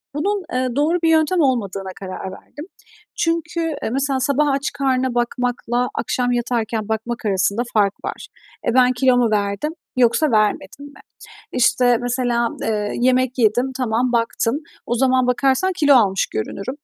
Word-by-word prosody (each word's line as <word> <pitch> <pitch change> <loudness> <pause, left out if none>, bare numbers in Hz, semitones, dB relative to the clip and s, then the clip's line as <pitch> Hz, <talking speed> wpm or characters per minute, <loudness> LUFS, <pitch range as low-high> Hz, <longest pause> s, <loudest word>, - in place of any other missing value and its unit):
bunun, 395 +5 -1
eee, 255 -1 -1
doğru 305 +5 +2
bir 325 - +4
yöntem 320 +3 +3
olmadığına 200 -8 -1
karar 190 0 -6
verdim. 295 - -11 0.5
Çünkü, 330 0 -1 0.2
eee, - - -1
mesela 270 +1 0
sabah 280 +3 +1
aç 275 +1 -1
karnına 260 -2 0
bakmakla 245 0 -1
akşam 245 -1 -1
yatarken 230 -3 -2
bakmak 225 +2 -3
arasında 200 +2 +1
fark 205 -2 +3
var. - - -6 0.4
E, 235 - 0
ben 255 -1 +5
kilo 250 0 +3
mu 235 -3 +2
verdim 205 +8 -1 0.3
yoksa 250 +4 +3
vermedim 215 +4 0
mi? 285 - -14 0.5
İşte, 245 0 +3
mesela, 245 -1 0
eee, 210 -2 -1
yemek 255 0 +2
yedim, 245 +3 +2
tamam, 245 0 0
baktım. 230 +2 0 0.3
O 240 - -1
zaman 255 0 +2
bakarsan 270 +8 +2
kilo 290 -2 +5
almış 195 -5 +3
görünürüm. 195 - -4
245 Hz, 150 wpm, -20 LUFS, 225-270 Hz, 0.5 s, ben